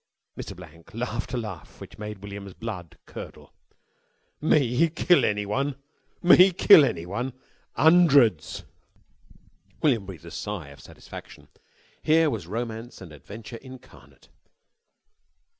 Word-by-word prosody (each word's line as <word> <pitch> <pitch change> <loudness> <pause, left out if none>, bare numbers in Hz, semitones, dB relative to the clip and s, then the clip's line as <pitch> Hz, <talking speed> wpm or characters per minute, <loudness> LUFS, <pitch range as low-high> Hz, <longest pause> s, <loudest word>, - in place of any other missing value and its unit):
Mr. - - -7
Blank 85 +5 -15
laughed 120 +1 -4
a 125 - -2
laugh 105 -8 -7
that - - -12
made 105 -2 -7
William's 100 -1 -8
blood 100 -8 -7
curdle. - - -11 0.9
"Me 150 0 +3
kill 170 +2 +3
anyone? 105 +7 -1 0.5
Me 185 +2 +7
kill 180 -2 +7
anyone? 115 +4 -2 0.4
'Ondreds!" 145 - +4 1.2
William 115 -10 +2
breathed 90 -7 -10
a - - -10
sigh 100 -9 -5
of 70 - -14
satisfaction. - - -12 0.5
Here 160 0 +3
was 100 -9 -5
romance 115 +3 -5
and 90 -4 -11
adventure 105 - -10
incarnate. 130 +1 -16
115 Hz, 110 wpm, -25 LUFS, 100-140 Hz, 1.2 s, Me